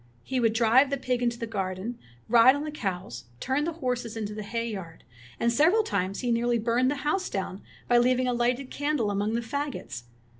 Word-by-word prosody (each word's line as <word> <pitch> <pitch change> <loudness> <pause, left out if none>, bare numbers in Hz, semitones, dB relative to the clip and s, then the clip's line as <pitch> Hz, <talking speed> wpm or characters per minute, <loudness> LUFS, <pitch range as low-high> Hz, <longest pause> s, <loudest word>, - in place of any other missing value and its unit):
He 260 -1 -2
would 225 -2 +2
drive 235 +4 +4
the 280 - -1
pig 250 -1 -1
into 235 -1 0
the 235 - -3
garden, 200 +1 -4 0.3
ride 240 +3 +7
on 285 - -3
the 305 - -4
cows, 185 - -4
turn 265 - 0
the 335 - -2
horses 240 -3 -2
into 210 -1 -4
the 215 - -5
hay 230 +3 -3
yard; 190 -7 -7 0.4
and 235 0 +2
several 340 - +4
times 195 - -2
he 245 -2 0
nearly 235 +1 +2
burned 235 +3 +2
the 290 - 0
house 370 +5 0
down 190 0 -4 0.3
by 240 0 +5
leaving 255 +1 +2
a 250 - +1
lighted 245 +2 0
candle 285 -7 0
among 205 +2 -1
the 235 - 0
fagots. 235 - -5
235 Hz, 210 wpm, -27 LUFS, 215-260 Hz, 0.4 s, ride